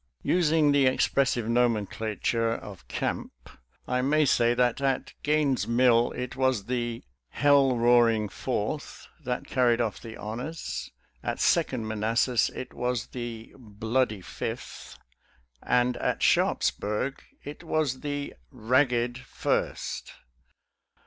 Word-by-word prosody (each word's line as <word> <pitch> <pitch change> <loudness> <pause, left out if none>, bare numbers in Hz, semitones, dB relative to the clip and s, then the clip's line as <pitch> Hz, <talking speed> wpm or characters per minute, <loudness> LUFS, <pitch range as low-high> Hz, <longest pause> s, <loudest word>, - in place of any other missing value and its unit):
Using 160 -4 +3
the 140 -2 +4
expressive 130 -2 +1
nomenclature 115 -1 0
of 100 -4 -10
camp, - - -3 0.6
I 125 0 0
may 150 +3 +3
say 120 -2 +3
that 125 +1 +1
at 135 -2 -1
Gaines' 150 -3 +1
Mill 120 0 +4
it 125 0 -5
was 130 -6 +1
the 120 -1 -3
" - - -55
Hell 140 -3 +5
roaring 115 -2 +4
Fourth 125 +6 -4
" - - -30
that 125 0 -2
carried 120 -3 +2
off 115 -3 -2
the 115 -1 -9
honors; 125 +10 -5 0.3
at - - -3
Second 110 - +1
Manassas 115 +2 +1
it 130 - -7
was 125 -2 -2
the 120 -2 -7
" - - -17 0.2
Bloody 110 -2 0
Fifth," - - -7 0.6
and 125 0 +2
at - - -1
Sharpsburg 105 +7 +1 0.2
it 145 +3 -9
was 155 -6 0
the 145 0 -4
" - - -38 0.2
Kagged 125 -2 +2
First." 125 - -3
125 Hz, 125 wpm, -27 LUFS, 115-135 Hz, 0.6 s, Hell